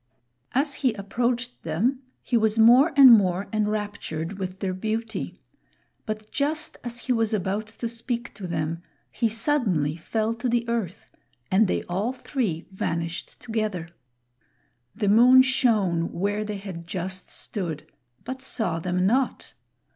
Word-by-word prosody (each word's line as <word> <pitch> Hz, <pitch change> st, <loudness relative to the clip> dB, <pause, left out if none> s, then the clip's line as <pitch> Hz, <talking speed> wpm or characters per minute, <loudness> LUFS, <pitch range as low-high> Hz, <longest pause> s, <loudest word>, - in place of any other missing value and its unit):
As 280 Hz, +2 st, +1 dB
he 255 Hz, -5 st, +3 dB
approached 240 Hz, +4 st, -2 dB
them 220 Hz, -, 0 dB, 0.2 s
he 245 Hz, -, -1 dB
was 220 Hz, -1 st, +2 dB
more 245 Hz, +8 st, +7 dB
and 270 Hz, -3 st, +10 dB
more 190 Hz, -3 st, +3 dB
enraptured 205 Hz, -4 st, -2 dB
with 185 Hz, 0 st, -4 dB
their 190 Hz, -2 st, -1 dB
beauty; 220 Hz, +4 st, -3 dB, 0.7 s
but 215 Hz, 0 st, -5 dB
just 300 Hz, +2 st, -1 dB
as 240 Hz, 0 st, -6 dB
he 255 Hz, -, 0 dB
was 225 Hz, -2 st, +1 dB
about 200 Hz, +2 st, -2 dB
to 225 Hz, +1 st, -5 dB
speak 235 Hz, +1 st, -4 dB
to 195 Hz, -3 st, -7 dB
them, 165 Hz, 0 st, -2 dB, 0.3 s
he 230 Hz, -, 0 dB
suddenly 220 Hz, -, +1 dB
fell 220 Hz, +6 st, -1 dB
to 240 Hz, +2 st, -3 dB
the 235 Hz, 0 st, 0 dB
earth, 225 Hz, -7 st, -3 dB, 0.4 s
and 200 Hz, +3 st, +4 dB
they -, -, -1 dB
all 200 Hz, +8 st, -2 dB
three 245 Hz, -, -3 dB
vanished 170 Hz, -2 st, -4 dB
together. 215 Hz, -7 st, -3 dB, 1.1 s
The 210 Hz, -1 st, -1 dB
moon 250 Hz, +5 st, +7 dB
shone 215 Hz, -10 st, +1 dB
where 205 Hz, +4 st, -1 dB
they 210 Hz, -1 st, -4 dB
had 185 Hz, -4 st, -8 dB
just 185 Hz, +1 st, -5 dB
stood, 170 Hz, -8 st, -5 dB, 0.4 s
but 260 Hz, 0 st, -6 dB
saw 220 Hz, -10 st, -1 dB
them 180 Hz, +2 st, 0 dB
not. 255 Hz, +6 st, 0 dB
215 Hz, 140 wpm, -25 LUFS, 185-240 Hz, 1.1 s, and